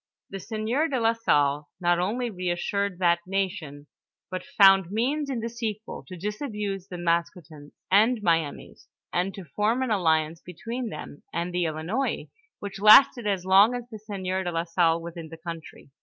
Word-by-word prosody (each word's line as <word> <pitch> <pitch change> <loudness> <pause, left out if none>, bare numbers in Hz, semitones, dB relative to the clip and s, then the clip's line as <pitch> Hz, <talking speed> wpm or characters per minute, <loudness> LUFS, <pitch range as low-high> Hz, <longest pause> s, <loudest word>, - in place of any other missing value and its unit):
The 195 - -5
sieur 225 - -1
de 270 -5 -1
la 225 0 +3
Salle 145 -10 +1
not 175 -1 +2
only 230 +6 -1
reassured 185 +1 -2
that 175 -1 +3
nation, 180 -7 -3 0.5
but 185 - -4
found 195 -9 +5
means 275 +8 -1
in 250 -4 -2
the 230 - -3
sequel, 225 -2 -5
to 185 - -9
disabuse 210 - -4
the 180 - -7
Maskoutens 170 -3 -3 0.2
and 220 +5 +4
Miamis, 165 -4 -1 0.3
and 180 +2 0
to 195 - -9
form 215 - 0
an 255 - -2
alliance 160 -4 +1
between 230 +8 -6
them 145 - -9
and 170 +1 -3
the 180 -1 0
Ilinois 165 - -2 0.3
which 200 -1 -7
lasted 215 +2 +7
as 190 -3 -1
long 200 +6 +6
as 245 -1 -6
the 220 -2 -9
sieur 190 -3 -3
de 175 - -2
la 165 0 -1
Salle 165 -1 +2
was 170 +1 -8
in 165 -2 -8
the 165 - -10
country. 165 -4 -9
190 Hz, 170 wpm, -26 LUFS, 170-220 Hz, 0.5 s, lasted